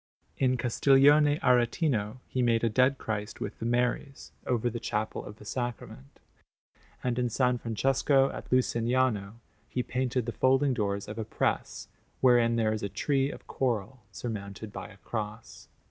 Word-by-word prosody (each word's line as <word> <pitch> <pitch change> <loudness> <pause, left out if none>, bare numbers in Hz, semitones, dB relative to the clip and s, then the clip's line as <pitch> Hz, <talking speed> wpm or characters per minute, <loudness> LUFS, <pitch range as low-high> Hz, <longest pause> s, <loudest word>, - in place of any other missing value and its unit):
In 130 -1 +2
Castiglione 140 +4 +4
Aretino 125 -2 +1
he 130 - -1
made 115 -2 +2
a 115 - +3
Dead 130 +5 +3
Christ, 105 -2 -4
with 105 - -5
the 115 - -2
Maries, 125 +3 -1 0.2
over 120 -1 +1
the 120 0 -3
Chapel 110 -1 -3
of 105 - -9
the 105 - -15
Sacrament; 120 - -6 0.8
and 125 -1 0
in 125 - +1
S. 115 - -5
Francesco, 130 +2 +2
at - - -9
Lucignano, 120 -4 +1 0.3
he 125 - -1
painted 125 -1 -1
the 120 - -2
folding 135 +3 +2
doors 100 -4 -2
of 105 +2 -6
a - - -1
press, 110 - -2 0.3
wherein 120 -2 +4
there 110 -2 +1
is 110 - -3
a 100 - -3
tree 135 +7 0
of - - -9
coral 120 -1 -2
surmounted 105 -2 -6
by - - -6
a 100 - -15
cross. 105 +1 -6
120 Hz, 160 wpm, -29 LUFS, 110-130 Hz, 0.8 s, Castiglione